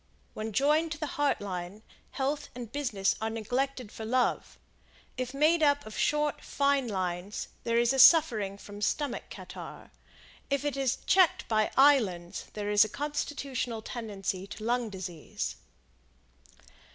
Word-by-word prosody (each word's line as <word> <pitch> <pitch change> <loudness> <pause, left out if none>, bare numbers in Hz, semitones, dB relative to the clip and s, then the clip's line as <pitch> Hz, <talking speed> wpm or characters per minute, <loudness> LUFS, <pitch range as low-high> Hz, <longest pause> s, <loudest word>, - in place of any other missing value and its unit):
When 220 +1 -4
joined 305 +7 +2
to 300 0 -4
Heart 290 -4 0
Line, 190 +1 -6 0.3
health 280 +2 -2
and 240 -3 -7
business 235 -9 0
are 220 - 0
neglected 245 +2 -2
for 220 - -8
Love; 250 +3 0 0.6
if 255 -1 -3
made 310 +4 +3
up 285 -1 +3
of 215 - -9
short, 300 0 0
fine 280 -2 +1
lines, 185 -1 -3 0.2
there 230 0 +1
is 235 +2 +3
suffering 225 - +6
from 205 0 -10
stomach 285 +4 -1
catarrh; - - -10 0.6
if 280 0 0
it 290 -2 -1
is 270 -2 0
checked 370 -3 +4
by 215 -1 +2
islands 215 -12 +3
there 205 -1 -3
is 205 0 +7
a 215 - -3
constitutional 275 -4 -3
tendency 195 -5 -4
to 215 - -9
lung 240 0 0
disease. 175 - -5
240 Hz, 140 wpm, -29 LUFS, 205-280 Hz, 0.6 s, is